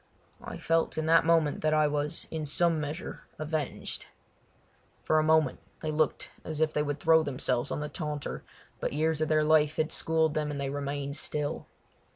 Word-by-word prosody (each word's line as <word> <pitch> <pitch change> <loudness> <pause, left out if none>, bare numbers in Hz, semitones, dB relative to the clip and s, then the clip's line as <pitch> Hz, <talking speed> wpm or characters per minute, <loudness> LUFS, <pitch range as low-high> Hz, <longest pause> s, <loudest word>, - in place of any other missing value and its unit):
I - - -6
felt 165 -1 0
in 155 - 0
that 165 0 +4
moment 165 -3 +3
that 155 0 +2
I 155 0 +4
was 145 0 -1
in 155 -2 -3
some 165 +1 +2
measure 150 +4 -6
avenged. 155 -2 -3 1.0
For 155 - +3
a - - +2
moment 155 -3 +3 0.2
they 155 - -2
looked 155 0 0
as 155 -1 -5
if 160 0 +2
they 150 - +1
would 145 0 -2
throw 160 +1 +5
themselves 130 -4 -1
on - - -3
the 150 - -2
taunter, 150 -3 -4 0.4
but - - -2
years 155 +1 +1
of 155 - +1
their 155 -1 +3
life 150 -1 +4
had 155 0 0
schooled 160 -1 +1
them 155 -1 -1
and 145 -1 -4
they 135 -1 -2
remained 140 0 -3
still. 150 -1 -2
155 Hz, 190 wpm, -29 LUFS, 145-160 Hz, 1.0 s, throw